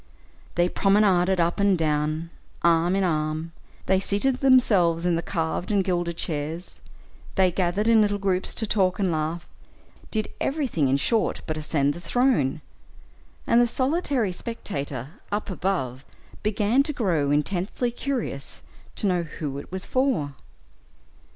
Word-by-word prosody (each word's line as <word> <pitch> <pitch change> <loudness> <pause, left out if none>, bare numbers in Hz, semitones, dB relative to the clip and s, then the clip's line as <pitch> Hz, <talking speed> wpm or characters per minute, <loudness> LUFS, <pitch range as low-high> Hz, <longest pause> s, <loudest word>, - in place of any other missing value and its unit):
They 175 +1 +3
promenaded 190 -2 +3
up 170 +3 +1
and 200 -2 +3
down, 155 +1 -1 0.3
arm 170 +2 +3
in 195 - +1
arm; 155 -1 -1 0.3
they 190 0 +3
seated 205 +7 +1
themselves 200 -11 +4
in 175 -1 +2
the 165 - 0
carved 165 0 -2
and 200 -2 +2
gilded 175 -2 -1
chairs; 160 +3 -4 0.6
they 185 -2 +4
gathered 185 +4 0
in 230 -1 +6
little 205 -1 +2
groups 190 -2 -1
to 225 - 0
talk 190 -4 +1
and 190 -3 +1
laugh, 160 +2 -2 0.6
did 215 -2 -2
everything, 270 - 0
in 135 +1 +3
short, 225 - 0
but 155 - -3
ascend 150 -2 0
the 170 - -9
throne; 200 - +1 0.8
and 235 - +4
the 240 - +4
solitary 260 - 0
spectator 145 - -5
up 205 -1 -2
above 140 -9 -2 0.4
began 215 +4 +2
to 300 +2 -1
grow 170 - 0
intensely 180 - 0
curious 240 - -4 0.3
to - - -2
know 180 -3 +2
who 150 -4 -5
it - - -11
was 190 0 -2
for. 255 - 0
180 Hz, 145 wpm, -25 LUFS, 160-215 Hz, 0.8 s, in